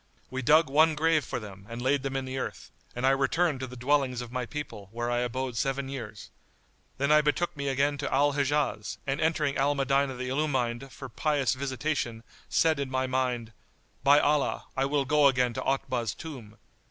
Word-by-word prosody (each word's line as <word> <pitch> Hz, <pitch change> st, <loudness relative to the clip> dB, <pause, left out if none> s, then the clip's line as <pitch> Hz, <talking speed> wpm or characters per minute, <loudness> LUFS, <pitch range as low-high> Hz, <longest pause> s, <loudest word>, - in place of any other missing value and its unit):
We 130 Hz, 0 st, -3 dB
dug 155 Hz, +5 st, +5 dB
one 155 Hz, +3 st, +4 dB
grave 160 Hz, 0 st, +2 dB
for -, -, -4 dB
them 100 Hz, -2 st, -11 dB
and 115 Hz, +1 st, -6 dB
laid 135 Hz, +3 st, +1 dB
them 135 Hz, 0 st, -4 dB
in 135 Hz, -1 st, -1 dB
the 130 Hz, 0 st, -4 dB
earth, -, -, -6 dB, 0.2 s
and 120 Hz, +2 st, -1 dB
I 135 Hz, -, +5 dB
returned 140 Hz, +3 st, +1 dB
to 130 Hz, -, -4 dB
the 125 Hz, -, -10 dB
dwellings 130 Hz, 0 st, +1 dB
of 120 Hz, -1 st, -6 dB
my 125 Hz, -1 st, -3 dB
people, 115 Hz, -10 st, -7 dB
where 120 Hz, +1 st, -2 dB
I 120 Hz, -, +1 dB
abode 125 Hz, +1 st, -2 dB
seven 135 Hz, +1 st, -1 dB
years. 110 Hz, -7 st, -7 dB, 0.7 s
Then 140 Hz, +2 st, +1 dB
I 150 Hz, 0 st, +7 dB
betook 150 Hz, +4 st, 0 dB
me 140 Hz, -1 st, -4 dB
again 140 Hz, +1 st, +1 dB
to -, -, -3 dB
Al 145 Hz, +2 st, +3 dB
Hijaz 140 Hz, -6 st, 0 dB
and 140 Hz, 0 st, -1 dB
entering 155 Hz, -3 st, +1 dB
Al 145 Hz, +2 st, +2 dB
Medinah 135 Hz, 0 st, +1 dB
the 125 Hz, 0 st, -4 dB
Illumined 130 Hz, -3 st, -1 dB
for 135 Hz, -, -8 dB
pious 140 Hz, +1 st, 0 dB
visitation 130 Hz, -3 st, -2 dB, 0.3 s
said 160 Hz, -3 st, +3 dB
in 140 Hz, -1 st, -2 dB
my 130 Hz, 0 st, 0 dB
mind, 125 Hz, -3 st, -1 dB, 0.5 s
"By 140 Hz, +1 st, +7 dB
Allah, 145 Hz, -1 st, +1 dB
I 135 Hz, -, +1 dB
will 140 Hz, 0 st, +1 dB
go 150 Hz, +1 st, +5 dB
again 125 Hz, -2 st, +2 dB
to -, -, -3 dB
Otbah's 130 Hz, -4 st, -1 dB
tomb!" 120 Hz, -10 st, -9 dB
135 Hz, 200 wpm, -28 LUFS, 125-145 Hz, 0.7 s, I